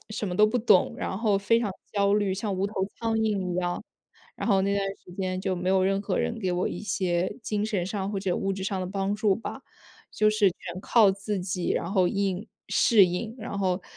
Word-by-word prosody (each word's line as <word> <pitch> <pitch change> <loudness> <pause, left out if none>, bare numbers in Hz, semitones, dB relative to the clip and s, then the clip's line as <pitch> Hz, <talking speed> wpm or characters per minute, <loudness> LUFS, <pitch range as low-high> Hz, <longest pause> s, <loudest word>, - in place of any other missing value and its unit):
什 210 -2 -3
么 180 - -3
都 215 - +6
不 245 +3 0
懂， 210 -5 +4
然 190 - -3
后 210 -3 +2
非 230 +4 +3
常 205 -5 -2 0.2
焦 200 -1 +3
虑， 205 -2 +1
像 200 0 -2
无 190 +2 0
头 205 - -9 0.2
苍 225 -1 -1
蝇 205 -5 0
一 - - -3
样。 175 -1 -1 0.5
然 - - -4
后 195 -3 +4
那 200 +1 +1
段 200 - +1 0.2
时 - - -14
间 185 -1 -2
就 190 -2 -1
没 180 +1 -2
有 190 -1 +3
任 195 +1 +1
何 200 -2 -1
人 230 - -1
给 185 -4 -1
我 180 +1 0
一 - - -5
些 185 -4 -1
精 210 -1 -1
神 205 -5 -1
上 200 0 -3
或 195 - -2
者 185 -2 0
物 195 0 -1
质 190 0 -5
上 195 -1 -2
的 185 - -3
帮 195 +1 -1
助 210 -1 +2
吧， 225 - -7 0.5
就 215 0 +3
是 215 -2 +3
全 175 +1 -8
靠 215 -1 +5
自 195 0 -3
己， 180 -1 -2
然 170 - -2
后 185 -3 +4
应 195 +1 -1 0.2
适 210 -5 +5
应。 195 +6 -3
然 215 -2 -5
后 185 -1 0
195 Hz, 255 characters per minute, -27 LUFS, 185-210 Hz, 0.5 s, 都